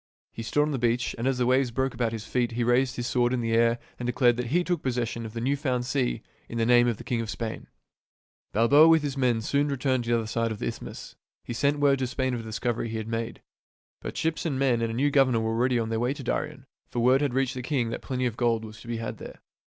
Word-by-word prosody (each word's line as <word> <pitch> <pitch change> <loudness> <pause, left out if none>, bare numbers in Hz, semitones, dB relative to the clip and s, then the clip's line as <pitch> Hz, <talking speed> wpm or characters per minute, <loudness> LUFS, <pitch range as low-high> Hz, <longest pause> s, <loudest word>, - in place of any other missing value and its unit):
He - - -6
stood 145 +6 +1
on 150 - -1
the 135 - -2
beach, 120 +1 +1
and 120 - 0
as 135 -1 +1
the 125 - +1
waves 130 +1 +3
broke 130 +3 -1
about 115 -1 -1
his 110 -1 -5
feet 120 -1 -1
he 120 +1 0
raised 125 +2 +2
his 120 - -3
sword 120 0 +1
in 125 - 0
the 115 -1 -1
air 115 +1 +3 0.2
and 120 - -3
declared 125 -1 +3
that 125 -1 -2
he 175 +8 +2
took 175 -1 -1
possession 120 -2 -2
of 110 - -11
the 115 - -4
new 135 +5 +1
found 130 -3 -1
sea - - -1 0.3
in 115 - -5
the 115 - +2
name 120 0 +5
of 115 -3 0
the - - -9
king 120 -2 -1
of 115 - -5
Spain. 115 0 -5 0.8
Balboa 140 +9 +6
with 165 -2 +5
his 145 -2 -2
men 125 -4 +1
soon 140 +6 +1
returned 130 -3 0
to - - -4
the 120 - +3
other 115 - -2
side 115 +1 -1
of 110 - -4
the - - -4
isthmus. - - -7 0.3
He - - -5
sent 140 +4 +1
word 140 -2 +3
to 130 - 0
Spain 130 +1 -1
of 120 - -2
the 110 -1 -7
discovery 115 +1 -2
he 110 - -3
had 110 0 -5
made. 115 0 -4 0.6
But - - -6
ships 160 -1 -1
and 150 -6 -1
men 130 -4 +2
and 115 - 0
a 115 - -4
new 145 +4 +2
governor 130 -5 +3
were 110 0 -1
already 125 +2 +2
on 115 -1 -1
their 115 0 -1
way 125 +4 0
to 140 - -8
Darien; 140 +2 -3 0.2
for 120 - -3
word 130 +3 +4
had 140 -4 0
reached 135 -1 +1
the 130 - -5
king 125 -3 -1
that - - -4
plenty 130 -1 -2
of 120 -3 -1
gold 115 -2 +1
was 110 0 -11
to.be 115 -1 -4
had 115 0 -5
there. - - -10
120 Hz, 280 wpm, -27 LUFS, 115-135 Hz, 0.8 s, Balboa